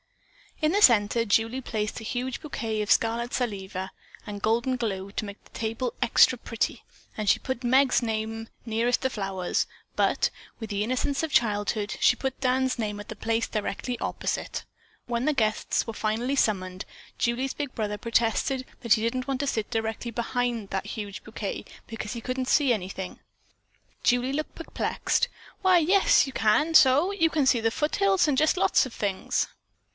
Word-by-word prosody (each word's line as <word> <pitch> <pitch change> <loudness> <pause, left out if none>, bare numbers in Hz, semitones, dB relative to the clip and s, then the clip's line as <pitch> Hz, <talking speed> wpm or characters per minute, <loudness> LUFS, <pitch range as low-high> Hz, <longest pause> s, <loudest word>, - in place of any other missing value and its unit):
In 310 - +4
the 410 - +2
center 230 - +5
Julie 225 +4 +1
placed 215 -4 -3
a - - -9
huge 245 +3 -3
bouquet 225 -7 -3
of 210 - -2
scarlet 235 +2 +2
salvia 195 -5 -3 0.4
and 205 -1 -6
golden 235 +4 +1
glow 200 -5 -3
to 210 - -3
make 200 0 -9
the - - -22
table 230 +2 -3
"extra 245 +1 +5
pretty," 230 -1 -3 0.3
and 215 -1 -3
she - - +5
put 260 -1 -4
Meg's 260 +2 +4
name 225 0 -3 0.2
nearest 230 +2 +1
the 260 - +1
flowers, 195 -4 -1 0.3
but, - - +2 0.3
with 220 -3 -6
the 205 0 -1
innocence 255 +4 0
of 320 - -2
childhood, 210 -3 +1
she - - +5
put 265 +1 -3
Dan's 260 0 +1
name 210 -2 -2
at 205 - -9
the 220 - -5
place 225 +2 0
directly 220 +3 -3
opposite. - - -3 0.4
When 240 +1 -1
the 305 - +3
guests 215 -5 0
were 225 - -4
finally 225 +5 -1
summoned, 185 -7 0 0.3
Julie's 250 +3 0
big 285 -3 -4
brother 210 -2 -2
protested 230 +4 0 0.2
that 235 -3 +4
he 215 - +2
didn't 255 +3 -1
want 270 -2 -1
to 285 - -1
sit 220 -5 -1
directly 225 +1 -2
behind 235 -2 -2
that 190 -1 -3
huge 205 -3 -6
bouquet 215 -2 -5 0.2
because 225 -1 -5
he 235 - -6
couldn't 255 +2 -3
"see 275 -3 +4
anything." 190 -2 -5 0.8
Julie 245 +2 +2
looked 305 +2 -3
perplexed. 330 - -1 0.3
"Why, 370 -1 +5
yes, 390 +8 +5
you 270 - -7
can 285 +10 +2
so! 295 +4 +6
You 330 -5 +2
can 300 -4 +2
see 245 - +4
the 225 0 +2
foothills, 385 - +2
and 285 -3 +1
just 310 +5 +3
lots 365 - +4
of 245 - -12
things." 195 -2 -1
235 Hz, 175 wpm, -27 LUFS, 215-260 Hz, 0.8 s, so